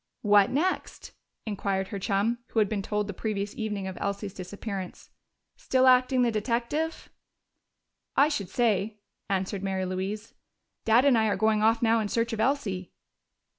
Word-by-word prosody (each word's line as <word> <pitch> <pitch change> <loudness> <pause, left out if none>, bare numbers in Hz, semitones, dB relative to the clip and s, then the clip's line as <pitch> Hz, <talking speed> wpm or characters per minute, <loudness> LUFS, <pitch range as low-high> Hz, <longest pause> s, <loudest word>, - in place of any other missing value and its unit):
"What 205 -2 +5
next?" 340 +8 -2 0.3
inquired 195 -2 -2
her 200 - -4
chum, 205 +4 0
who - - -9
had 215 -2 +4
been 205 -1 -2
told 210 +1 -1
the 205 - -5
previous 205 0 -3
evening 210 -3 -3
of 190 -1 -6
Elsie's 200 0 -3
disappearance. 190 0 -7 0.5
"Still 260 0 +2
acting 255 0 +5
the 240 - +2
detective?" 235 +9 -2 1.1
"I 280 - +6
should 205 - -3
say," 215 -3 +1 0.3
answered 190 0 -1
Mary 190 -1 -1
Louise. 195 +4 -4 0.5
"Dad 230 +4 +5
and 275 -3 +5
I 220 -1 +3
are 205 - +1
going 220 -1 +2
off 225 +2 +3
now 230 0 +4
in 215 - -1
search 230 +2 -1
of 220 - -3
Elsie." 220 -8 -1
215 Hz, 160 wpm, -27 LUFS, 195-235 Hz, 1.1 s, I